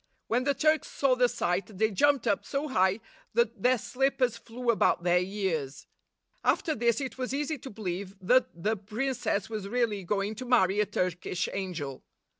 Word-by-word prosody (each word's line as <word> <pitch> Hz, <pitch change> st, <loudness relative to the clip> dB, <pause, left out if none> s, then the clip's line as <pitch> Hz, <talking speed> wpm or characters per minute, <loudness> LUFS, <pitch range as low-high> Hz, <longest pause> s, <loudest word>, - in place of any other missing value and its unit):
When 245 Hz, +3 st, 0 dB
the 280 Hz, 0 st, +2 dB
Turks 310 Hz, +2 st, +2 dB
saw 275 Hz, -2 st, +2 dB
the 250 Hz, -1 st, +3 dB
sight 195 Hz, -3 st, -2 dB
they 220 Hz, +2 st, +2 dB
jumped 280 Hz, +5 st, +3 dB
up 200 Hz, -, +1 dB
so 280 Hz, +2 st, -2 dB
high 190 Hz, -2 st, +2 dB, 0.3 s
that 475 Hz, 0 st, +1 dB
their 255 Hz, +1 st, +4 dB
slippers 255 Hz, 0 st, 0 dB
flew 235 Hz, +1 st, -2 dB
about 210 Hz, -5 st, +2 dB
their 175 Hz, 0 st, +4 dB
ears. 180 Hz, -8 st, -3 dB, 0.6 s
After 315 Hz, -, +2 dB
this 235 Hz, -3 st, +1 dB
it 265 Hz, -1 st, -5 dB
was 255 Hz, +1 st, -2 dB
easy 295 Hz, +1 st, -2 dB
to 265 Hz, -, -8 dB
believe 195 Hz, -2 st, -5 dB
that 190 Hz, -4 st, +2 dB
the 220 Hz, +2 st, +2 dB
princess 220 Hz, 0 st, -2 dB
was 215 Hz, -3 st, -5 dB
really 220 Hz, -3 st, 0 dB
going 200 Hz, +3 st, -1 dB
to 255 Hz, -, -5 dB
marry 200 Hz, -5 st, +3 dB
a 210 Hz, -, +2 dB
Turkish 180 Hz, -2 st, -1 dB
angel. 170 Hz, -9 st, -4 dB
220 Hz, 175 wpm, -29 LUFS, 190-255 Hz, 0.6 s, their